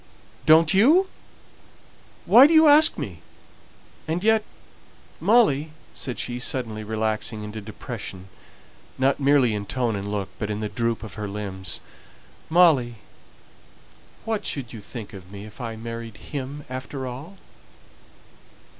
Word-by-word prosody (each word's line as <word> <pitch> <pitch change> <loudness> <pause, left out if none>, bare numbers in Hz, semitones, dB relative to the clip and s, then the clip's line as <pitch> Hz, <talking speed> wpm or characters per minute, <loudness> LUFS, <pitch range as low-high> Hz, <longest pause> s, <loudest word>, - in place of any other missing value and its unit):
"Don't 160 +2 +6
you? 310 - +5 1.2
Why 260 +4 +8
do 325 - +2
you 315 0 +7
ask 300 +2 +7
me? - - -6 0.9
and 165 +4 -2
yet, 220 0 +3 0.8
Molly," 160 - +3 0.2
said 125 -2 -5
she, 120 0 -4
suddenly 115 -4 -2
relaxing 110 0 -2
into 105 +1 -7
depression, 95 -2 -8 0.7
not 135 +2 +1
merely 140 -4 +3
in 100 -1 -4
tone 120 -2 -1
and 100 +1 -5
look, 100 -2 -3
but 105 - -3
in 105 0 -3
the 105 -1 -3
droop 115 0 -2
of 110 - -8
her 105 - -3
limbs 100 -2 -6 0.7
"Molly, 155 -9 +4 1.3
what 225 -2 -2
should 130 -4 -4
you 115 - -7
think 110 +1 -8
of 95 -2 -12
me 100 0 -9
if 110 +5 -12
I 115 -2 -5
married 115 -1 -7
him 140 +1 -7
after 130 +1 -6
all?" 140 +10 -8
125 Hz, 135 wpm, -24 LUFS, 105-155 Hz, 1.3 s, Why